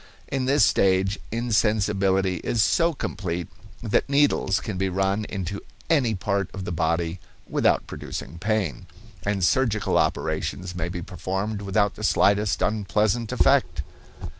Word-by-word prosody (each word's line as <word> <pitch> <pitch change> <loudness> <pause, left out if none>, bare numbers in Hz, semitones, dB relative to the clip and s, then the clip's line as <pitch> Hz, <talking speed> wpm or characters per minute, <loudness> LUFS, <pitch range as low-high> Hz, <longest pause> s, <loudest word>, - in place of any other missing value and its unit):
In 135 -2 -1
this 140 +2 +4
stage 95 +1 +2
insensibility 105 -5 +1
is 110 +5 +1
so 170 +8 +3
complete 90 - -4 0.4
that 115 +4 +1
needles 140 -9 +3
can 105 - -5
be 95 +1 0
run 95 +3 0
into 100 -1 -4 0.3
any 130 -9 +3
part 100 0 -1
of 95 -1 -5
the - - -3
body 85 +1 -1 0.3
without - - +2
producing 80 +6 -7
pain, 100 - -1 0.3
and 100 -2 -1
surgical 110 +2 +2
operations 90 -1 -1
may 85 -1 -3
be 90 -1 -5
performed 95 +3 -3
without 100 0 +1
the 105 - -9
slightest 100 0 +2
unpleasant 105 +2 0
effect. 110 - +2
100 Hz, 135 wpm, -24 LUFS, 95-110 Hz, 0.4 s, this